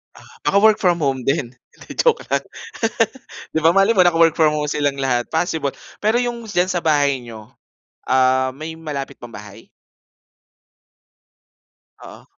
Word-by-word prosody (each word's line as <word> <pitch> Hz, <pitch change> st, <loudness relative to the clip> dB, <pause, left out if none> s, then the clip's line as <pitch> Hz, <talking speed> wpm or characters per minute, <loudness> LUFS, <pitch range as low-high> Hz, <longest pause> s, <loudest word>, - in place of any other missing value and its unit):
Ah, -, -, -16 dB, 0.2 s
naka-work 210 Hz, +2 st, +4 dB
from 180 Hz, -5 st, +1 dB
home 135 Hz, -4 st, -1 dB
din, 130 Hz, -2 st, -1 dB
hindi, 120 Hz, -, -20 dB
joke 480 Hz, -2 st, +1 dB
lang. -, -, 0 dB, 1.1 s
'Di -, -, +3 dB
ba 165 Hz, -, +6 dB
malay 195 Hz, +5 st, +3 dB
mo 185 Hz, -, +6 dB
naka-work 165 Hz, -2 st, +4 dB
from 155 Hz, -2 st, +3 dB
home 150 Hz, -1 st, -2 dB
silang 145 Hz, -1 st, -1 dB
lahat 125 Hz, -3 st, -1 dB
possible. 160 Hz, -3 st, -1 dB, 0.3 s
Pero 220 Hz, +3 st, +3 dB
'yung 240 Hz, -1 st, -3 dB
diyan 180 Hz, -1 st, +1 dB
sa 180 Hz, -2 st, -2 dB
bahay 145 Hz, -4 st, +2 dB
niyo, 110 Hz, -2 st, -11 dB, 0.6 s
ah, 130 Hz, 0 st, +2 dB
may 160 Hz, +3 st, -8 dB
malapit 145 Hz, -4 st, -6 dB
pang 120 Hz, -1 st, -12 dB
bahay? 105 Hz, -1 st, -11 dB, 2.3 s
Oo. -, -, -13 dB
150 Hz, 145 wpm, -20 LUFS, 130-175 Hz, 2.3 s, ba